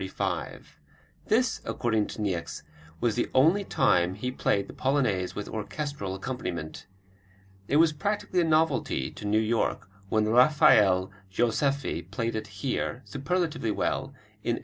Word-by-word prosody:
This, 230 +1 +2
according 110 -3 0
to - - -7
Niecks, 85 -6 -3 0.4
was 120 -2 +1
the 120 - -1
only 165 +10 +5
time 95 - +2
he 125 +6 -3
played 100 -5 0
the - - -10
Polonaise 125 -10 0
with 105 - -5
orchestral 110 -2 -4
accompaniment. 95 -8 -5 0.8
It 140 - 0
was 160 0 +5
practically 190 +2 -1
a - - +2
novelty 155 - +1
to - - -9
New 105 +1 +2
York 110 -2 0 0.2
when 110 +1 +2
Rafael 105 -7 +5 0.2
Joseffy 120 - 0
played 115 +2 -2
it 110 -1 -4
here, 120 +5 -3
superlatively 150 -3 -2
well, 105 - -1 0.4
in - - 0
1879. - - -5
120 Hz, 135 wpm, -27 LUFS, 100-145 Hz, 0.8 s, only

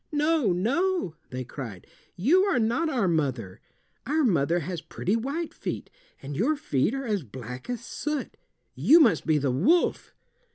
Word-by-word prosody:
"No, 300 - +2
no," 275 - 0 0.2
they 130 0 -4
cried, 115 -7 -8 0.3
"you 295 - +4
are 395 -8 +1
not 240 +8 +1
our 240 -10 +1
mother. 130 - -1 0.5
Our 310 +3 +2
mother 170 - +2
has 170 +1 -4
pretty 195 +5 -2
white 280 +8 -3
feet, - - -5 0.3
and 140 +1 -6
your 255 - +2
feet 210 - 0
are 270 0 -4
as 210 -4 0
black 125 - -9
as 240 -1 -4
soot. 300 +3 -4 0.4
You 330 - +6
must 225 - +3
be 155 -1 +4
the 140 -2 0
wolf." 210 - +1
210 Hz, 160 wpm, -26 LUFS, -, 0.5 s, You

